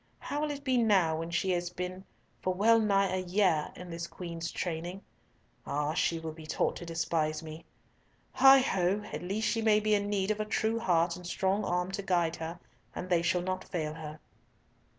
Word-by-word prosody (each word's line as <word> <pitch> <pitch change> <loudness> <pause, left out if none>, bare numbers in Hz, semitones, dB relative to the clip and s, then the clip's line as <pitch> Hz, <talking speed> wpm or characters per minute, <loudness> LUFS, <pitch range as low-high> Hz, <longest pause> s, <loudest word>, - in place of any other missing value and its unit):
How 290 - -4
will 305 - 0
it 285 -1 -5
be 260 -3 +2
now 190 -8 +3
when 165 +1 -4
she 185 +2 0
has 175 -1 0
been 180 +1 -5 0.4
for 185 0 -1
well 225 +4 +5
nigh 195 -3 +2
a 185 - 0
year 180 -4 +1
in 180 -1 -9
this 170 +1 -4
Queen's 170 -2 -6
training? 175 +2 -4 0.6
Ah! 150 +1 -1
she 165 0 +1
will 160 -1 -5
be 155 0 -11
taught 155 - 0
to 175 - -8
despise 160 -1 -1
me! 155 +1 -9 0.7
Heigh 270 0 +7
ho! 195 -4 +1
At 150 - -3
least 200 +5 -1
she 225 - 0
may 215 -1 +4
be 215 0 +1
in 205 0 +1
need 200 0 0
of 215 - -2
a 215 - -1
true 220 +1 0
heart 170 -5 +2
and 180 0 -9
strong 190 +3 0
arm 180 +1 -1
to 200 +1 -3
guard 175 -4 +1
her, 165 +1 -6 0.4
and 180 0 -5
they 170 -1 +4
shall 175 +1 +1
not 185 0 -2
fail 155 -4 -3
her." 155 -1 -8
180 Hz, 205 wpm, -30 LUFS, 165-205 Hz, 0.7 s, Heigh